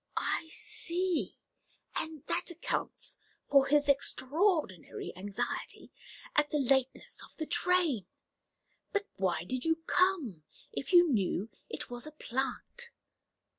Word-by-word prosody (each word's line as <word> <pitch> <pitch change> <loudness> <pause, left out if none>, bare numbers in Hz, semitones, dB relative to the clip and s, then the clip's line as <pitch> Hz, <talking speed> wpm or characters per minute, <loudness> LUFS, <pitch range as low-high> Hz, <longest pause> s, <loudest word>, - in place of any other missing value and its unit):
"I 320 - 0
see; 355 0 -1 0.6
and 315 -3 -2
that - - 0
accounts 345 -1 -3 0.3
for 275 -1 +6
his 290 0 +4
extraordinary 285 - +1
anxiety 195 +1 -4 0.4
at 295 0 +4
the 300 - +1
lateness 270 - +1
of - - -15
the 315 - -2
train. 325 - +2 0.9
But 405 0 +1
why 180 -4 +1
did 255 +7 -3
you 325 0 +3
come, 330 - +2 0.3
if 275 - -4
you 350 -1 +8
knew 200 0 +1 0.2
it - - -5
was 245 +3 -4
a - - -7
'plant'?" 270 - -3
290 Hz, 120 wpm, -32 LUFS, 245-345 Hz, 0.9 s, you